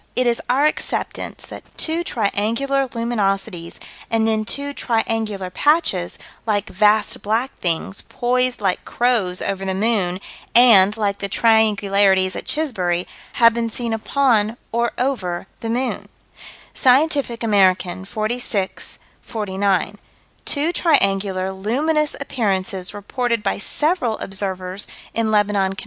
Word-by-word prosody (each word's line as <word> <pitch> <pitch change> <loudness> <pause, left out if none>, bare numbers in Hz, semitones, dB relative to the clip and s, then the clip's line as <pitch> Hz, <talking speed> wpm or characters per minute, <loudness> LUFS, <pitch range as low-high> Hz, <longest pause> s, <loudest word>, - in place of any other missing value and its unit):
It 255 - +2
is 235 -1 +1
our 270 +4 +3
acceptance 305 - -2
that - - -9 0.2
two 330 +2 0
triangular 235 - 0
luminosities 200 -7 -2 0.3
and 225 -1 +2
then 220 -1 0
two 285 +5 -2
triangular 225 -6 -1
patches, 290 - +1 0.3
like 205 -2 0
vast 210 +2 +2
black 225 +6 -1
things, 175 +3 -1
poised 250 -1 0
like 190 -2 0
crows 225 -7 0
over 195 -1 -3
the 190 -1 -2
moon, 195 -4 +1 0.4
and, 220 -4 +7
like 200 -2 -1
the 200 - -3
triangularities 200 -4 +3
at - - -6
Chisbury, 185 - -1 0.3
have 230 -3 +5
been 230 0 -1
seen 230 0 -3
upon, 225 -2 +1
or 235 +1 0
over, 205 -10 -2
the 225 - -5
moon: 250 +2 -2 0.7
Scientific 265 -2 +2
American, 190 -3 +2
46 215 -1 -1 0.2
49: 200 -2 -1 0.5
Two 310 +4 +1
triangular, 195 - +2
luminous 290 +11 0
appearances 195 -9 -2
reported 230 +2 -2
by 200 - -1
several 295 - 0
observers 190 0 -3 0.3
in 230 -1 0
Lebanon, 205 -2 +2
Conn. - - -7
215 Hz, 120 wpm, -20 LUFS, 195-245 Hz, 0.7 s, and